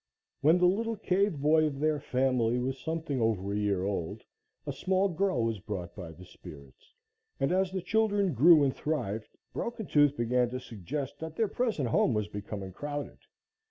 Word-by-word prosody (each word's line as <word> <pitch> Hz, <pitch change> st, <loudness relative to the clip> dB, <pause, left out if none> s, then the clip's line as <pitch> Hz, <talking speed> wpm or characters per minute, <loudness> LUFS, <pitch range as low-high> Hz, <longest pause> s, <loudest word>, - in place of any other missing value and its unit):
When 160 Hz, +4 st, +5 dB
the 180 Hz, -, +3 dB
little 225 Hz, +5 st, +1 dB
cave 200 Hz, -3 st, +1 dB
boy 155 Hz, +2 st, +4 dB
of 140 Hz, -3 st, -3 dB
their 155 Hz, 0 st, +1 dB
family 125 Hz, -3 st, +1 dB
was 130 Hz, +2 st, -2 dB
something 160 Hz, -4 st, -3 dB
over 100 Hz, -3 st, 0 dB
a -, -, -1 dB
year 100 Hz, -3 st, 0 dB
old, 95 Hz, -4 st, -3 dB, 0.4 s
a 145 Hz, -, -3 dB
small 190 Hz, +8 st, +1 dB
girl 170 Hz, -8 st, 0 dB
was 115 Hz, -2 st, -1 dB
brought 90 Hz, -3 st, -6 dB
by 90 Hz, -5 st, -7 dB
the 85 Hz, +3 st, -13 dB
spirits, 70 Hz, -5 st, -14 dB, 0.4 s
and 135 Hz, -, +1 dB
as 190 Hz, 0 st, +1 dB
the 190 Hz, -2 st, -3 dB
children 205 Hz, -4 st, +1 dB
grew 155 Hz, +4 st, +7 dB
and 135 Hz, -2 st, +1 dB
thrived, 120 Hz, -9 st, -2 dB, 0.3 s
Broken 235 Hz, -2 st, -4 dB
Tooth 145 Hz, -3 st, +3 dB
began 120 Hz, +1 st, +1 dB
to 125 Hz, +1 st, -4 dB
suggest 130 Hz, -, -6 dB
that 160 Hz, 0 st, -6 dB
their 225 Hz, -, +1 dB
present 210 Hz, -, -1 dB
home 115 Hz, +1 st, +2 dB
was 105 Hz, -1 st, -1 dB
becoming 100 Hz, -2 st, -6 dB
crowded. 145 Hz, +7 st, -6 dB
140 Hz, 180 wpm, -30 LUFS, 110-175 Hz, 0.4 s, grew